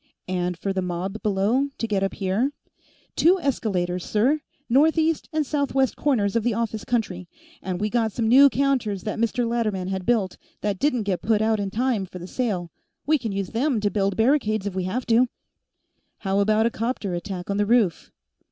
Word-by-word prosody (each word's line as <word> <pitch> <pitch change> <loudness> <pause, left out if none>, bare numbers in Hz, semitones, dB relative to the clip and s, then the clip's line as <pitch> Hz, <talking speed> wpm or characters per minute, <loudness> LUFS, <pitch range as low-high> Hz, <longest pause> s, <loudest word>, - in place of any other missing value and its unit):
"And 180 -1 -1
for 195 +3 -2
the 190 - -1
mob 180 +4 -4
below 215 +6 +1
to 230 - -2
get 205 -3 0
up 195 - -1
here?" 205 +9 0 0.6
"Two 365 +4 +4
escalators, 185 - -1
sir, 260 +9 +1 0.3
northeast 315 +5 +2
and 310 -1 0
southwest 275 -2 0
corners 225 -8 +1
of 230 - +2
office 225 -2 -1
country. 190 -7 -2 0.3
And 185 -1 -3
we 210 - 0
got 230 -2 +1
some 225 +2 -1
new 275 +5 +8
counters 250 -8 0
that 215 - -3
Mr. 235 +1 0
Latterman 215 -6 -1
had 190 -1 -4
built, 215 -6 +1 0.2
that 205 -2 -1
didn't 250 -6 +1
get 195 -3 -1
put 220 0 +2
out 220 -1 +2
in 200 -1 -2
time 225 -2 0
for 180 - -9
the 175 - -8
sale. 185 -6 -2 0.3
We 305 0 +3
can 225 -3 -3
use 195 -2 -3
them 250 +1 0
to 205 -1 0
build 195 -2 0
barricades, 220 -4 +2
if 200 - -3
we 185 -1 -2
have 235 +7 -2
to." 235 +2 +4 0.9
"How 195 -1 -1
about 215 +2 +3
a 235 - +2
'copter 225 -4 -2
attack 180 +1 -4
on 200 - -1
the 205 0 +1
roof?" 220 -8 +2
215 Hz, 190 wpm, -24 LUFS, 195-245 Hz, 0.9 s, new